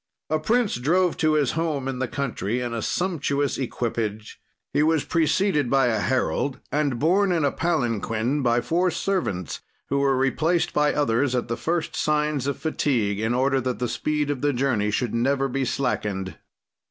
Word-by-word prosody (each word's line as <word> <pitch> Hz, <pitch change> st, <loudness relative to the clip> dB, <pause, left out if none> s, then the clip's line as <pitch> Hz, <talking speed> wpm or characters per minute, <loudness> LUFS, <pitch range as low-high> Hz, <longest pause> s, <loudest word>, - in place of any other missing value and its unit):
"A 155 Hz, -, +2 dB
prince 225 Hz, -, +1 dB
drove 175 Hz, +7 st, +2 dB
to 155 Hz, -1 st, +2 dB
his 145 Hz, -4 st, +2 dB
home 155 Hz, -5 st, -2 dB
in 130 Hz, -2 st, -3 dB
the 130 Hz, -, -1 dB
country 125 Hz, -5 st, -2 dB
in 120 Hz, -1 st, -3 dB
a 115 Hz, -, -2 dB
sumptuous 145 Hz, -6 st, -1 dB
equipage. 115 Hz, -4 st, -3 dB, 0.3 s
"He 145 Hz, -, +3 dB
was 155 Hz, -1 st, +2 dB
preceded 160 Hz, -3 st, +1 dB
by 135 Hz, -2 st, +3 dB
a 110 Hz, -2 st, 0 dB
herald 130 Hz, +3 st, 0 dB
and 145 Hz, -4 st, 0 dB
borne 185 Hz, +8 st, +3 dB
in 165 Hz, -4 st, +2 dB
a 140 Hz, -, +2 dB
palanquin 120 Hz, -, 0 dB
by 120 Hz, -1 st, +2 dB
four 175 Hz, +6 st, +1 dB
servants, 155 Hz, -, -2 dB, 0.3 s
who 140 Hz, -, +1 dB
were 135 Hz, -1 st, +2 dB
replaced 155 Hz, +6 st, +1 dB
by 150 Hz, 0 st, +3 dB
others 130 Hz, -2 st, +1 dB
at 120 Hz, -1 st, -2 dB
the 115 Hz, -, 0 dB
first 165 Hz, +4 st, -2 dB
signs 150 Hz, -3 st, 0 dB
of 140 Hz, -, -1 dB
fatigue, 120 Hz, -10 st, 0 dB
in 110 Hz, +2 st, 0 dB
order 135 Hz, +1 st, +2 dB
that 125 Hz, 0 st, -2 dB
the 125 Hz, -, -1 dB
speed 150 Hz, +3 st, -1 dB
of 135 Hz, -3 st, -4 dB
the 145 Hz, -1 st, +2 dB
journey 120 Hz, -5 st, +1 dB
should 110 Hz, +2 st, -1 dB
never 135 Hz, +4 st, +1 dB
be 135 Hz, 0 st, -1 dB
slackened. 100 Hz, -8 st, -2 dB
140 Hz, 175 wpm, -24 LUFS, 120-155 Hz, 0.3 s, He